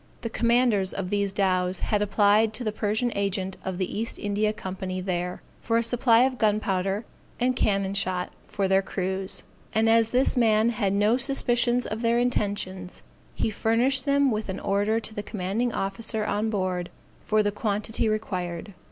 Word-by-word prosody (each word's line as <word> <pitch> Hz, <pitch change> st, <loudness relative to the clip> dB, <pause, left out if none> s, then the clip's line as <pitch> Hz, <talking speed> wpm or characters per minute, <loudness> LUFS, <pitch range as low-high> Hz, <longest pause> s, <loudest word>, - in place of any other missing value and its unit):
The 230 Hz, -, -4 dB
commanders 235 Hz, -5 st, +2 dB
of 190 Hz, -2 st, -4 dB
these 200 Hz, -1 st, +1 dB
dows 185 Hz, -2 st, +1 dB
had 210 Hz, -1 st, 0 dB
applied 210 Hz, +1 st, +3 dB
to 250 Hz, -, -4 dB
the 215 Hz, -, -1 dB
Persian 215 Hz, +3 st, -1 dB
agent 190 Hz, -1 st, -1 dB
of 190 Hz, -1 st, -4 dB
the 190 Hz, +2 st, -2 dB
East 230 Hz, -, -3 dB
India 205 Hz, +1 st, 0 dB
Company 190 Hz, -2 st, -5 dB
there, 180 Hz, -1 st, -3 dB, 0.2 s
for 230 Hz, 0 st, 0 dB
a 230 Hz, -, +2 dB
supply 235 Hz, 0 st, +4 dB
of 260 Hz, -1 st, 0 dB
gunpowder 205 Hz, -1 st, 0 dB, 0.3 s
and 250 Hz, +1 st, +1 dB
cannon 195 Hz, -4 st, +1 dB
shot 185 Hz, -2 st, -1 dB
for 195 Hz, -2 st, -2 dB
their 190 Hz, 0 st, +4 dB
cruise: 190 Hz, 0 st, -3 dB, 0.3 s
and 220 Hz, +1 st, +3 dB
as 225 Hz, 0 st, +4 dB
this 255 Hz, +3 st, +3 dB
man 225 Hz, -2 st, +3 dB
had 210 Hz, -4 st, 0 dB
no 210 Hz, +4 st, +3 dB
suspicions 245 Hz, -2 st, +2 dB
of 220 Hz, +1 st, -4 dB
their 235 Hz, 0 st, +2 dB
intentions, 200 Hz, -6 st, -2 dB, 0.3 s
he 220 Hz, -, -1 dB
furnished 245 Hz, +6 st, +1 dB
them 280 Hz, -1 st, +3 dB
with 215 Hz, -2 st, -3 dB
an 190 Hz, -, -3 dB
order 205 Hz, +3 st, +1 dB
to 220 Hz, -, -6 dB
the 205 Hz, -, -4 dB
commanding 210 Hz, +4 st, -2 dB
officer 215 Hz, +2 st, -2 dB
on 215 Hz, +1 st, 0 dB
board 185 Hz, -4 st, -2 dB, 0.3 s
for 215 Hz, 0 st, +2 dB
the 205 Hz, -, +1 dB
quantity 210 Hz, +1 st, -1 dB
required. 185 Hz, -3 st, -3 dB
210 Hz, 170 wpm, -26 LUFS, 195-230 Hz, 0.3 s, supply